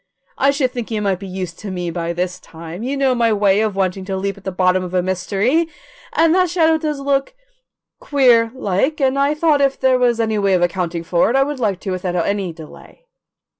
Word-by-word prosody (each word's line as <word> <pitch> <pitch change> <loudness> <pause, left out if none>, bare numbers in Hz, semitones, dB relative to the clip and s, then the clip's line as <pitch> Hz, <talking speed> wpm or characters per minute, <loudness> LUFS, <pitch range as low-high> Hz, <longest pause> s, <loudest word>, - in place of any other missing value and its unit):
"I 275 - +4
should 280 -3 +1
think 240 -3 -5
you 220 -2 -2
might 195 -3 -1
be 195 - -8
used 185 -2 -6
to 210 - -7
me 180 -2 -3
by 170 0 -3
this 180 +1 -3
time. 165 +1 -10
You 265 +4 -2
know 270 -2 +2
my 235 -2 +2
way 205 -1 +3
of 215 -3 -1
wanting 190 0 -1
to 190 0 -3
leap 195 +1 -2
to 200 - -16
the 190 0 -4
bottom 185 0 +2
of 180 0 -5
a 180 - +2
mystery, 200 - 0 0.5
and 325 0 +3
that 365 -1 +3
shadow 320 -2 +2
does 300 -2 -3
look 275 - -1 0.6
queer, 245 -5 +3
like 260 +6 -1
and 270 0 +1
I 285 +2 +2
thought 305 -2 +2
if 275 -1 +1
there 260 -1 +3
was 240 -2 +2
any 220 -2 0
way 195 -2 +2
of 175 - +1
accounting 175 -1 -1
for 170 +3 +2
it 245 - 0
I 270 - +5
would 285 -1 -4
like 205 -6 0
to 195 - -4
without 185 -1 -3
any 190 +1 -1
delay." 165 - -14
210 Hz, 230 wpm, -19 LUFS, 185-275 Hz, 0.6 s, I